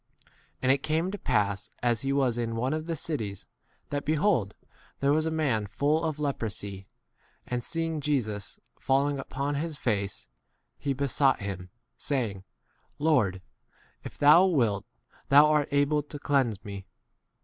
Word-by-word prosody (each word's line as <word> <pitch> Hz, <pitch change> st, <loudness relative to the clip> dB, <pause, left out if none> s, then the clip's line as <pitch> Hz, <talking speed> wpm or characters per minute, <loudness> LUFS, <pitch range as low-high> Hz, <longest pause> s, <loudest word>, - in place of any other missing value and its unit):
12 -, -, -29 dB, 0.3 s
And 130 Hz, -, +5 dB
it 135 Hz, -, +4 dB
came 160 Hz, +6 st, 0 dB
to 205 Hz, -, -4 dB
pass 100 Hz, -2 st, 0 dB
as 120 Hz, -2 st, +2 dB
he 135 Hz, -, -1 dB
was 135 Hz, -4 st, +2 dB
in 115 Hz, -1 st, -2 dB
one 125 Hz, +5 st, 0 dB
of 155 Hz, +1 st, -3 dB
the 165 Hz, -, -1 dB
cities, 110 Hz, -, -3 dB, 0.5 s
thatP 145 Hz, 0 st, -1 dB
behold, 150 Hz, -, +1 dB, 0.4 s
there 140 Hz, +1 st, +2 dB
was 155 Hz, +1 st, +1 dB
a -, -, +1 dB
man 135 Hz, -10 st, 0 dB
full 150 Hz, -, +1 dB
of 155 Hz, -2 st, -1 dB
leprosy, 105 Hz, -9 st, -4 dB, 0.6 s
and 125 Hz, -1 st, -3 dB
seeing 165 Hz, 0 st, -1 dB
Jesus, 115 Hz, -9 st, -2 dB, 0.2 s
falling 140 Hz, +1 st, +1 dB
upon 140 Hz, +2 st, -3 dB
his 155 Hz, +1 st, -3 dB
face, 100 Hz, -6 st, -2 dB, 0.5 s
he 140 Hz, -, -1 dB
besought 135 Hz, -1 st, +2 dB
him, 95 Hz, -2 st, -5 dB, 0.3 s
saying, 115 Hz, -9 st, -1 dB, 0.5 s
Lord, 125 Hz, -, +2 dB, 0.6 s
if -, -, -9 dB
thou 155 Hz, +6 st, +7 dB
wilt 115 Hz, -, +1 dB, 0.4 s
thou 145 Hz, +2 st, +8 dB
art 150 Hz, -1 st, +2 dB
able 145 Hz, +1 st, +2 dB
to 145 Hz, 0 st, -9 dB
13 -, -, -13 dB
cleanse 130 Hz, -8 st, +1 dB
me. 100 Hz, -2 st, -7 dB
140 Hz, 155 wpm, -28 LUFS, 110-150 Hz, 0.6 s, thou